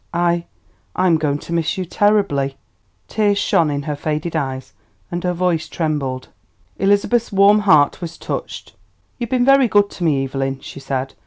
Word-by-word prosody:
"I 175 Hz, 0 st, +1 dB, 0.5 s
I 185 Hz, -, +1 dB
am 165 Hz, -3 st, +3 dB
going 145 Hz, -2 st, 0 dB
to 170 Hz, -, -8 dB
miss 165 Hz, 0 st, 0 dB
you 185 Hz, -, -2 dB
terribly." 175 Hz, -9 st, +1 dB, 0.5 s
Tears 205 Hz, -2 st, +1 dB
shone 170 Hz, -6 st, +2 dB
in 145 Hz, -1 st, -2 dB
her 150 Hz, -1 st, -3 dB
faded 155 Hz, +3 st, -3 dB
eyes 135 Hz, -4 st, -3 dB, 0.4 s
and 175 Hz, 0 st, -3 dB
her 180 Hz, -, +1 dB
voice 175 Hz, -2 st, 0 dB
trembled. 140 Hz, -6 st, -3 dB, 0.5 s
Elizabeth's 205 Hz, +4 st, +2 dB
warm 200 Hz, +1 st, +5 dB
heart 145 Hz, 0 st, +4 dB
was 170 Hz, -1 st, -6 dB
touched. -, -, -6 dB, 0.5 s
"You've 235 Hz, -2 st, -3 dB
been 250 Hz, -1 st, +2 dB
very 275 Hz, -1 st, +5 dB
good 205 Hz, -2 st, +3 dB
to 180 Hz, -, -7 dB
me, 145 Hz, -5 st, +2 dB
Evelyn," 135 Hz, 0 st, -3 dB
she -, -, -9 dB
said. 135 Hz, -1 st, -3 dB
170 Hz, 170 wpm, -19 LUFS, 145-200 Hz, 0.5 s, warm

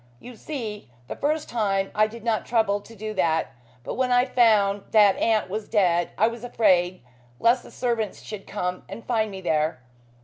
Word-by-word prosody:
You 250 Hz, 0 st, -11 dB
see, 220 Hz, -, -6 dB, 0.2 s
the -, -, -5 dB
first 305 Hz, +2 st, -1 dB
time 195 Hz, -4 st, -1 dB
I 215 Hz, 0 st, +3 dB
did 225 Hz, 0 st, -11 dB
not 225 Hz, -2 st, 0 dB
trouble 220 Hz, -4 st, +1 dB
to 225 Hz, +3 st, -15 dB
do 215 Hz, +1 st, -5 dB
that, 165 Hz, -5 st, 0 dB, 0.3 s
but -, -, -5 dB
when 255 Hz, 0 st, 0 dB
I 245 Hz, 0 st, +4 dB
found 215 Hz, -6 st, +3 dB
that 205 Hz, -3 st, +6 dB
aunt 220 Hz, -2 st, +1 dB
was 210 Hz, +3 st, -5 dB
dead 175 Hz, -5 st, +2 dB
I 220 Hz, -, +4 dB
was 230 Hz, 0 st, -6 dB
afraid 185 Hz, -, +2 dB, 0.4 s
lest 240 Hz, +2 st, +3 dB
the -, -, -14 dB
servants 235 Hz, -4 st, -2 dB
should 210 Hz, -2 st, -8 dB
come 180 Hz, -3 st, -3 dB
and 230 Hz, -, -9 dB
find 220 Hz, -3 st, 0 dB
me 190 Hz, -1 st, -8 dB
there. 160 Hz, -3 st, 0 dB
215 Hz, 190 wpm, -24 LUFS, 195-235 Hz, 0.4 s, that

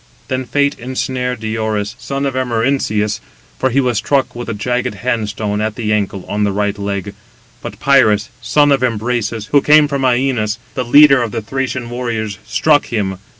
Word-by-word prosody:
Then 130 Hz, 0 st, -2 dB
fate 140 Hz, +2 st, 0 dB
ensnared 125 Hz, -1 st, -3 dB
Diores, 110 Hz, -1 st, -2 dB
son 135 Hz, +3 st, -3 dB
of 135 Hz, -, -1 dB
Amarynceus; 115 Hz, -4 st, 0 dB, 0.4 s
for 130 Hz, -, +2 dB
he 135 Hz, +3 st, +1 dB
was 125 Hz, -5 st, +1 dB
struck 140 Hz, -2 st, 0 dB
with 120 Hz, 0 st, -6 dB
a -, -, -1 dB
jagged 125 Hz, +4 st, -2 dB
hand 115 Hz, -4 st, -1 dB
stone, 105 Hz, -1 st, -2 dB
at 110 Hz, 0 st, -2 dB
the 110 Hz, -3 st, -1 dB
ankle, 100 Hz, -2 st, -2 dB
on 105 Hz, +1 st, -1 dB
the 100 Hz, -, +1 dB
right 105 Hz, +1 st, -1 dB
leg; 100 Hz, 0 st, -3 dB, 0.5 s
but -, -, -8 dB
Pirus, 125 Hz, -5 st, +3 dB
son 145 Hz, -1 st, +3 dB
of 135 Hz, -2 st, +3 dB
Imbrasus, 115 Hz, -2 st, -1 dB
who 145 Hz, -, +5 dB
came 150 Hz, +1 st, +5 dB
from 140 Hz, -2 st, -2 dB
Ænos, 125 Hz, -4 st, +1 dB, 0.2 s
the 130 Hz, -, -2 dB
leader 140 Hz, +2 st, +6 dB
of 120 Hz, -, -1 dB
the 110 Hz, -, -4 dB
Thracian 130 Hz, +1 st, -3 dB
warriors, 115 Hz, -5 st, -3 dB
struck 145 Hz, +7 st, +2 dB
him. 95 Hz, -5 st, -2 dB
120 Hz, 180 wpm, -16 LUFS, 105-130 Hz, 0.5 s, leader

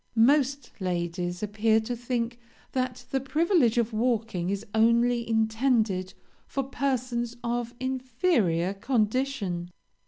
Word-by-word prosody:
Most 275 Hz, +4 st, +3 dB
ladies 175 Hz, 0 st, -2 dB
appear 215 Hz, +2 st, +2 dB
to 240 Hz, +3 st, -3 dB
think 240 Hz, 0 st, -2 dB, 0.3 s
that 255 Hz, -1 st, -2 dB
the 270 Hz, -, +1 dB
privilege 295 Hz, -, +2 dB
of 235 Hz, -1 st, +1 dB
walking 220 Hz, -6 st, 0 dB
is 200 Hz, +1 st, -2 dB
only 235 Hz, +1 st, +3 dB
intended 220 Hz, -4 st, +1 dB, 0.3 s
for 275 Hz, -, -2 dB
persons 250 Hz, -3 st, -2 dB
of 240 Hz, 0 st, -2 dB
inferior 250 Hz, -, +1 dB
condition. 215 Hz, -5 st, -1 dB
235 Hz, 105 wpm, -27 LUFS, 210-255 Hz, 0.3 s, Most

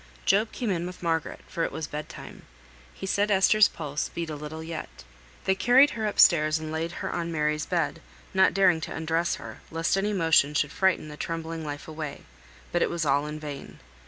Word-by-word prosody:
Job 210 Hz, +3 st, +3 dB
came 235 Hz, -5 st, -2 dB
in 175 Hz, -1 st, -1 dB
with 180 Hz, 0 st, -9 dB
Margaret, 165 Hz, -2 st, -1 dB
for 170 Hz, -, -2 dB
it -, -, -1 dB
was 160 Hz, +1 st, -4 dB
bed 150 Hz, 0 st, -6 dB
time. -, -, -10 dB, 0.5 s
He -, -, -8 dB
said 200 Hz, +2 st, +1 dB
Esther's 205 Hz, +2 st, +5 dB
pulse 150 Hz, -2 st, -4 dB
beat 170 Hz, -2 st, -4 dB
a -, -, -4 dB
little 150 Hz, +2 st, -7 dB
yet. 160 Hz, -, -7 dB, 0.4 s
They 190 Hz, -, +3 dB
carried 250 Hz, +8 st, +5 dB
her 220 Hz, -2 st, -2 dB
upstairs 155 Hz, -6 st, +5 dB
and 155 Hz, 0 st, -6 dB
laid 160 Hz, +1 st, -2 dB
her -, -, -2 dB
on 170 Hz, -1 st, -2 dB
Mary's 150 Hz, -1 st, 0 dB
bed, -, -, -1 dB, 0.3 s
not 190 Hz, 0 st, +4 dB
daring 185 Hz, -4 st, +4 dB
to -, -, -5 dB
undress 165 Hz, +2 st, 0 dB
her, -, -, -9 dB
lest 165 Hz, +2 st, 0 dB
any 205 Hz, +2 st, 0 dB
motion 160 Hz, -5 st, +3 dB
should 145 Hz, 0 st, +1 dB
frighten 185 Hz, -3 st, +1 dB
the 150 Hz, -, -9 dB
trembling 165 Hz, 0 st, -4 dB
life 145 Hz, -1 st, -6 dB
away; 155 Hz, -2 st, -6 dB, 0.5 s
but 175 Hz, -, +1 dB
it -, -, +2 dB
was 170 Hz, -2 st, -2 dB
all 145 Hz, +1 st, +2 dB
in 150 Hz, 0 st, -5 dB
vain. 145 Hz, -2 st, -8 dB
165 Hz, 205 wpm, -27 LUFS, 155-185 Hz, 0.5 s, Esther's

